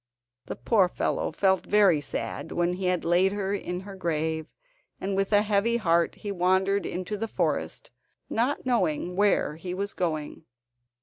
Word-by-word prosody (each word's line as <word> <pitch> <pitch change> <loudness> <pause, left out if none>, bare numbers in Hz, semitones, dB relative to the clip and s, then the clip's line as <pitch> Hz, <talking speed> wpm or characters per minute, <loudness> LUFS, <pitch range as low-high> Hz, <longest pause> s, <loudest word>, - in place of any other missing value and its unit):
The - - -4
poor 185 - +2
fellow - - -1
felt 190 +3 +2
very 195 -7 +4
sad 145 - -4
when 175 0 0
he 185 +1 -4
had 180 -2 0
laid 180 +3 +3
her 200 -1 -2
in 180 -2 -3
her 195 0 -9
grave, 160 -3 -2 0.5
and 195 +1 -2
with 195 +1 0
a 205 0 +5
heavy 215 +3 +2
heart 170 -6 +2
he 205 - -6
wandered 190 +2 +1
into 185 +4 -4
the 225 +2 -3
forest, - - -2 0.4
not 250 +6 -1
knowing 180 -8 0
where 200 -6 +2
he 180 +2 -5
was 200 +1 -3
going. 155 -3 -3
190 Hz, 165 wpm, -27 LUFS, 175-205 Hz, 0.5 s, a